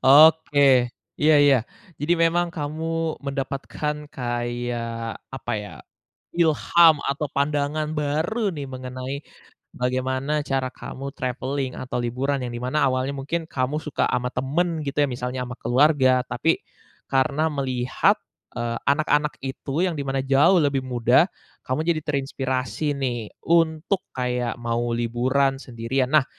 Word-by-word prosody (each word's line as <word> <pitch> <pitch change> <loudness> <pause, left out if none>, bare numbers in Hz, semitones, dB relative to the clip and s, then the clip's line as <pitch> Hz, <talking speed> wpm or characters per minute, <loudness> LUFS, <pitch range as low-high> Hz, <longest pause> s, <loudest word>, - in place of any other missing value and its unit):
Oke 145 -3 +6 0.3
iya 155 +1 +5
iya, 145 -2 +6 0.4
jadi 165 +4 +2
memang 170 +1 +2
kamu 160 +1 -3
mendapatkan 140 +2 -4
kayak 120 -3 -3
apa - - -5
ya? 105 - -9 0.6
Ilham 165 0 +5
atau 140 +2 -1
pandangan 145 +2 0
baru 155 +9 0
nih 145 - -5
mengenai, 130 +1 -5 0.6
bagaimana 130 +4 -1
cara 135 -2 -1
kamu 140 +1 -7
travelling 130 +1 -2
atau 130 - -4
liburan 130 +3 -1
yang 120 - -3
dimana 125 +5 -1
awalnya 130 +2 0
mungkin 160 +5 -3
kamu 135 +1 -1
suka 150 -3 -1
ama 125 0 0
temen 160 +5 0
gitu 145 +1 -3
ya 145 - +2
misalnya 125 +1 -3
sama 125 - -6
keluarga 130 0 +4
tapi, - - +1 0.5
karena 140 +3 +2
melihat, 130 -3 +1 0.4
eee, 120 -1 -2
anak-anak 150 +1 +2
itu 135 +4 -2
yang 170 - -2
dimana 135 -1 -2
jauh 140 +7 +5
lebih 140 -3 +1
muda, 125 +6 +3 0.4
kamu 155 +6 -2
jadi 155 - -3
terinspirasi 135 -1 -2
nih 120 -5 -3 0.2
untuk 165 +3 +2
kayak 125 -1 -1
mau 120 0 -1
liburan 130 +4 +1
sendirian 125 +1 -2
nah, 155 -3 +6
135 Hz, 125 wpm, -24 LUFS, 125-150 Hz, 0.6 s, Oke